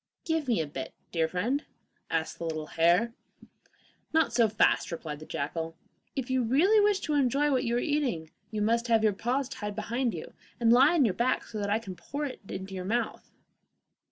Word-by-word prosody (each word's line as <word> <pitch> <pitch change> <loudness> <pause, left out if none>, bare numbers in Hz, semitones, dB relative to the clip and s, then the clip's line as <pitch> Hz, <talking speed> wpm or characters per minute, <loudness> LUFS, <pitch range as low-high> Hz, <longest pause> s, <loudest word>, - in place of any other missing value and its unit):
'Give 320 -4 0
me 235 -6 +2
a 160 - 0
bit, 135 -2 -7 0.2
dear 165 -2 +1
friend,' 235 - -1 0.5
asked 160 -1 -2
the - - -5
little 155 -1 -3
hare. 170 +9 +3 1.0
'Not 320 -6 +2
so 230 -2 +4
fast,' 210 -3 +2
replied 155 -3 -5
the 155 - -11
jackal. 165 +3 -3 0.4
'If 265 -3 -2
you 260 0 +2
really 310 - +4
wish 410 -2 +3
to 305 - -2
enjoy 285 +1 +2
what 255 -2 +1
you 235 0 0
are - - +2
eating, 250 - -1 0.2
you 210 -1 -2
must 230 +2 +1
have 225 -2 +3
your 215 -2 +4
paws 250 +6 -1
tied 210 -6 -5
behind 235 +1 -1
you, 160 - -8 0.3
and 230 -1 +5
lie 275 +7 +6
on 290 -6 +5
your 205 - +2
back, 240 +6 +1
so 215 - -7
that 200 0 -2
I 205 - +3
can 195 -5 -7
pour 285 - -4
it 270 - -6
into 190 +1 -6
your 185 -1 -4
mouth. 225 +5 -2
230 Hz, 205 wpm, -29 LUFS, 180-265 Hz, 1.0 s, lie